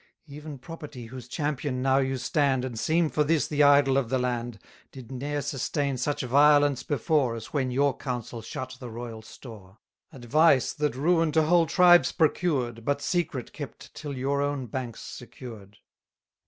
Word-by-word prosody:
Even 150 0 -9
property 150 -3 -9
whose 125 0 -10
champion 140 -2 -2
now 135 0 +3
you 135 -1 -1
stand, 135 0 +1
220 - - -2
And 115 - -6
seem 160 +4 +2
for 150 - +2
this 155 -2 +1
the 150 -1 0
idol 140 -2 +5
of 125 -4 -4
the 130 - +1
land, 120 -2 -2 0.3
Did 130 -3 -11
ne'er 145 +2 -3
sustain 140 0 -2
such 145 +4 -2
violence 145 +1 +4
before, 140 -3 0
As 115 -1 -9
when 135 -4 0
your 135 +1 +1
counsel 125 -4 -5
shut 130 +2 -7
the 125 - -8
royal 115 -1 -7
store; 110 -4 -13 0.3
Advice, 135 +2 +3
that 150 -3 -1
ruin 165 +3 +2
to 160 0 +4
whole 170 +1 +3
tribes 175 -6 +5
procured, 135 -8 0
But 145 +3 -1
secret 160 -9 -2
kept - - -9
till 145 -3 -6
your 140 +2 0
own 145 -2 -2
banks 120 -1 -6
secured. 110 -5 -10
135 Hz, 170 wpm, -27 LUFS, 125-150 Hz, 0.3 s, idol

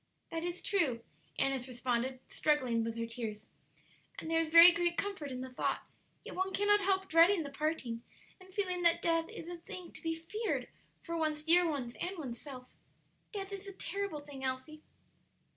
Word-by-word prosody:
"That 330 0 -3
is 350 +1 -4
true," 275 - +1 0.3
Annis 270 -2 +1
responded, 255 +1 -2
struggling 255 -7 +1
with 230 0 -4
her 230 - -1
tears, 225 -2 -5 0.7
"and 325 -9 -5
there 325 - +4
is 330 - +1
very 335 +2 +11
great 345 0 0
comfort 385 -9 -3
in 255 0 -5
the 260 0 -7
thought; - - -1 0.4
yet - - -7
one 380 +1 -1
cannot 415 +1 +5
help 385 -1 +1
dreading 335 +2 +5
the 280 - -7
parting, 280 -6 -2 0.4
and 370 0 -15
feeling 370 -3 -1
that 340 0 +4
death 330 -1 +1
is 330 - -8
a 350 0 -6
thing 345 +1 -9
to - - -10
be 325 0 -1
feared 425 +8 -3 0.3
for 335 - -4
one's 310 -2 -1
dear 340 +2 +5
ones 255 -6 -3
and 370 +2 -2
one's 250 -7 -5
self. 260 -4 -8 0.7
Death 395 -2 -5
is 395 0 -7
a 395 - -7
terrible 375 -4 -4
thing, 285 -2 -10
Elsie." 260 +4 -3
325 Hz, 185 wpm, -33 LUFS, 260-360 Hz, 0.7 s, very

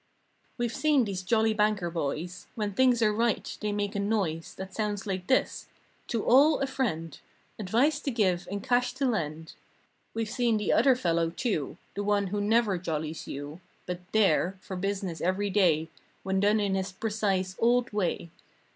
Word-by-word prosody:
We've 240 -1 -1
seen 295 -5 +3
these 195 -3 -3
jolly 220 +3 +2
banker 210 -5 +1
boys. 165 +2 -4
When 210 -2 -2
things 245 +1 +3
are 210 -1 +3
right, 230 0 0
they 210 -1 -1
make 205 -1 -2
a 200 - -2
noise 200 -6 -1
That 190 0 -8
sounds 210 -1 -2
like 185 -3 -3
this: 260 - +1 0.4
"To 230 -4 -2
all, 285 +5 +6
a 275 - +1
friend" 210 - -3 0.4
"Advice 245 +9 +2
to 290 - -3
give 190 -8 +1
and 200 +1 -4
cash 250 -1 +1
to 270 +2 -1
lend." 160 - -2 0.6
We've 225 -1 -1
seen 235 0 +1
the 210 - +1
other 265 -2 +5
fellow, 170 -7 +1
too; 165 - -2 0.2
The 205 - -3
one 205 -1 +1
who 205 - 0
never 210 -3 +2
jollies 160 -2 -4
you. 145 +5 -7 0.2
But 180 -1 -4
there, 195 -3 +2
for 190 - -7
business 190 -2 -3
every 195 +3 0
day, 165 -6 +3 0.4
When 190 0 0
done 205 +2 +3
in 200 -2 0
his 190 0 -1
precise, 195 -2 -1
"old" 240 0 +2
way. 180 -4 -1
205 Hz, 175 wpm, -28 LUFS, 180-225 Hz, 0.6 s, all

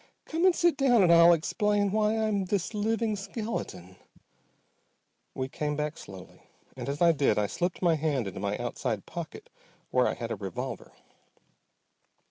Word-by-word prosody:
Come 330 +3 0
and 365 - +4
sit 345 -1 +2
down 245 -6 +4
and 170 -2 +5
I'll 170 +1 +8
explain 205 +5 +1
why 215 +1 +1
I'm 215 -3 0
this 195 +2 -2
living 220 +1 0
skeleton." 195 - -6 1.4
We 130 -1 -2
came 150 +1 -3
back 150 +1 -2
slowly, 95 -2 -12 0.3
and - - -5
as 145 +4 -1
I 170 - +7
did 145 -3 +1
I 105 - +2
slipped 175 - -3
my 170 -2 +4
hand 150 -6 0
into 95 - -6
my 100 +1 -2
outside 120 -3 -3
pocket 175 - -8 0.4
where - - +3
I - - -1
had - - -5
a - - -1
revolver. - - -6
175 Hz, 160 wpm, -28 LUFS, 140-215 Hz, 1.4 s, I'll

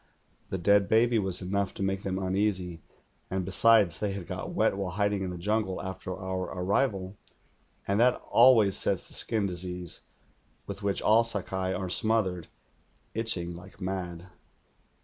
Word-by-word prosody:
The 95 - -2
dead 100 +2 +3
baby 115 +1 +3
was 95 -2 -1
enough 100 +2 -2
to - - -4
make 95 0 -1
them 95 -1 -3
uneasy, 95 -3 -1 0.5
and 95 -1 -2
besides, 100 -3 +5
they 105 -2 -1
had 95 -3 -6
got 90 +2 -6
wet - - +1
while 95 -3 -4
hiding 100 0 0
in 95 - -3
the 90 - -6
jungle 100 +1 -1
after 95 0 -6
our 95 -1 -3
arrival, 100 0 -1 0.7
and 100 +2 +1
that 125 +1 +4 0.2
always 115 -5 +6
sets - - 0
the - - -8
skin 110 -3 +2
disease, 90 -1 -3 0.6
with - - -7
which 100 -1 -1
all 110 +2 +5
Sakai 95 -4 -1
are 95 0 -3
smothered, 95 -4 +1 0.7
itching 90 -7 -1
like 90 +3 -13
mad. 90 -2 -5
95 Hz, 155 wpm, -28 LUFS, 90-105 Hz, 0.7 s, always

